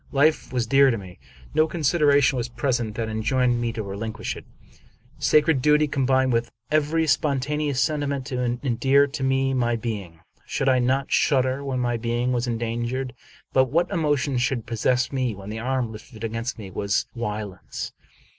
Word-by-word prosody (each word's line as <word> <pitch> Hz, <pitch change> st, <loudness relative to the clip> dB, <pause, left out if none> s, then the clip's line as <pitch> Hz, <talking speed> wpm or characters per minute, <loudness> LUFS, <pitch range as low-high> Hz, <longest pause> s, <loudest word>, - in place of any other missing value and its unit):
Life 150 Hz, 0 st, +2 dB
was 125 Hz, -2 st, 0 dB
dear 135 Hz, +3 st, +5 dB
to 115 Hz, -, 0 dB
me. 95 Hz, -3 st, -11 dB, 0.3 s
No 155 Hz, +1 st, +4 dB
consideration 150 Hz, -3 st, +3 dB
was 120 Hz, -1 st, -2 dB
present 120 Hz, -3 st, -1 dB
that 115 Hz, -1 st, -2 dB
enjoined 120 Hz, +3 st, +1 dB
me 120 Hz, -1 st, 0 dB
to 110 Hz, -, -4 dB
relinquish 110 Hz, +3 st, -4 dB
it. -, -, -10 dB, 0.7 s
Sacred 150 Hz, -2 st, +3 dB
duty 150 Hz, +2 st, +4 dB
combined 130 Hz, -2 st, +2 dB
with 115 Hz, 0 st, 0 dB, 0.2 s
every 155 Hz, +2 st, +2 dB
spontaneous 145 Hz, -1 st, 0 dB
sentiment 140 Hz, -3 st, 0 dB
to 125 Hz, -2 st, -3 dB, 0.2 s
endear 135 Hz, +2 st, +3 dB
to 140 Hz, 0 st, -5 dB
me 135 Hz, 0 st, +1 dB
my 120 Hz, -2 st, +1 dB
being. 100 Hz, -8 st, -5 dB, 0.2 s
Should 135 Hz, -, 0 dB
I 130 Hz, -1 st, +4 dB
not 130 Hz, +2 st, 0 dB
shudder 130 Hz, 0 st, +2 dB
when 135 Hz, -2 st, -2 dB
my 120 Hz, -1 st, 0 dB
being 120 Hz, +2 st, -1 dB
was 120 Hz, 0 st, -1 dB
endangered? 120 Hz, +2 st, -2 dB, 0.4 s
But 130 Hz, 0 st, +5 dB
what 170 Hz, +8 st, 0 dB
emotion 145 Hz, -6 st, +1 dB
should 120 Hz, -2 st, 0 dB
possess 125 Hz, +2 st, 0 dB
me 130 Hz, -5 st, -1 dB
when 100 Hz, +1 st, -8 dB
the 110 Hz, -, -4 dB
arm 125 Hz, -1 st, -1 dB
lifted 110 Hz, +1 st, -11 dB
against 115 Hz, +2 st, -3 dB
me 100 Hz, -4 st, -8 dB
was 100 Hz, +2 st, 0 dB
Wieland's? 105 Hz, -5 st, -5 dB
130 Hz, 165 wpm, -24 LUFS, 115-140 Hz, 0.7 s, dear